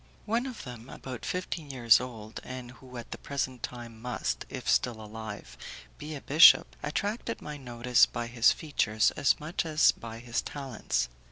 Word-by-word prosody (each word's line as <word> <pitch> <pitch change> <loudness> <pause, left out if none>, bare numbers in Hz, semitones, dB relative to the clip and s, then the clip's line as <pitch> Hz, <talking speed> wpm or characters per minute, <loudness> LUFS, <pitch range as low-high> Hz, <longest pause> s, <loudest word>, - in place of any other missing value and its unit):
One 235 +4 0
of 250 -4 -7
them, 120 0 -9
about 130 -3 -7
fifteen 175 -4 -3
years 120 -4 +5
old, 115 -4 -7
and 125 -1 -7
who 125 0 -12
at 120 - -8
the - - -6
present 130 -3 -3
time 120 -2 -7
must, 125 0 -2
if - - -7
still 120 -3 +2
alive, 105 - -8 0.4
be 155 +1 -6
a 140 - -7
bishop, 155 +4 +7
attracted 205 +10 -2
my 150 0 -7
notice 125 -1 +3
by 120 - -4
his 120 +1 +4
features 110 -8 +1
as 140 - +2
much 155 +3 -2
as 155 -2 +4
by 115 -1 -9
his 120 0 -2
talents. 135 - -2
125 Hz, 170 wpm, -29 LUFS, 115-150 Hz, 0.4 s, bishop